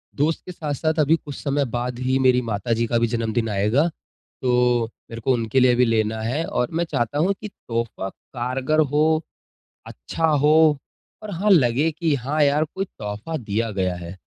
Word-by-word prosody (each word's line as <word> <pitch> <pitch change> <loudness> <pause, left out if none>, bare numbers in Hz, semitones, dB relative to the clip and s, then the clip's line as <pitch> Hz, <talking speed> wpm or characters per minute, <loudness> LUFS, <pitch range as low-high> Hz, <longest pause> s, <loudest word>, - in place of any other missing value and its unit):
दोस्त 155 +3 0
के 180 - -7
साथ-साथ 155 0 -2
अभी 155 +2 +4
कुछ 145 -3 -8
समय 140 -1 0
बाद 120 0 -3
ही 130 +1 +1
मेरी 130 -1 +4
माताजी 115 +1 -1
का 120 - +1
भी 115 - +2
जन्मदिन 115 -1 -1
आएगा, 105 +11 +2 0.5
तो 125 -2 +2 0.2
मेरे 115 0 -7
को 130 - +2
उनके 115 +2 +1
लिए 125 -1 +5
भी 125 +1 +4
लेना 110 -1 0
है। 130 +9 -1
और 125 - -1
मैं 170 +1 0
चाहता 135 -2 -2
हूँ 185 +6 +2
कि 210 - -5
तोहफ़ा 115 - -4
कारगर 130 +7 -2
हो, 155 +2 +2 0.6
अच्छा 160 - -3
हो 150 0 +4 0.5
और 210 - -6
हाँ, 195 +4 0
लगे 145 -1 +4
कि 160 -1 0
हाँ 140 +5 -1
यार, 145 +2 +3
कोई 190 +5 -4
तोहफ़ा 105 - -6
दिया 115 -1 -2
गया 95 -2 -1
है। 85 +1 -8
130 Hz, 180 wpm, -22 LUFS, 115-155 Hz, 0.6 s, लिए